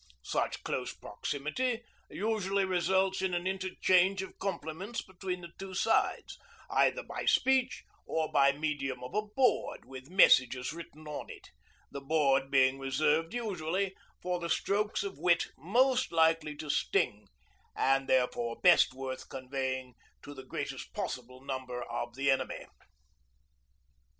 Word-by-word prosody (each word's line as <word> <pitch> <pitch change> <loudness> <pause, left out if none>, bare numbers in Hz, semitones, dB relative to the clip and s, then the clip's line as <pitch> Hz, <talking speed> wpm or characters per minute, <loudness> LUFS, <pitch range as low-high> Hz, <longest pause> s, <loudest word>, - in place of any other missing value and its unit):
Such - - -2
close - - -2
proximity 225 - -3 0.3
usually 200 -2 0
results 190 +1 +1
in 190 -2 0
an 175 +1 -2
interchange 190 0 +2
of 190 - -11
compliments 190 +4 -4
between 185 -1 -5
the 170 -1 -10
two 195 -1 -7
sides, - - +1 0.3
either - - +3
by - - -6
speech, 260 -1 +2 0.2
or 160 -1 -1
by 140 0 +5
medium 140 -3 -3
of 125 - -8
a 210 - +2
board 225 +5 0
with 130 +1 -10
messages 130 -8 +5
written 155 -2 -10
on 150 - -5
it - - -12 0.4
the 140 - -6
board 135 -2 +2
being 135 -1 +4
reserved 150 - +1
usually 190 -4 -2 0.3
for 180 0 -1
the 170 -1 -4
strokes 205 +5 0
of 200 -1 -6
wit 175 -1 +3
most 255 - +2
likely 160 -2 +2
to 150 -1 -3
sting, 105 -5 0 0.5
and 135 0 +2
therefore 120 -2 +1
best 175 -7 +5
worth 130 -1 -6
conveying 130 -1 -3 0.3
to 145 - -9
the 135 - -9
greatest - - -5
possible 125 +1 -5
number 130 -2 -4
of 120 0 -5
the 135 +1 +2
enemy. 130 -1 -1
160 Hz, 135 wpm, -31 LUFS, 135-190 Hz, 0.5 s, by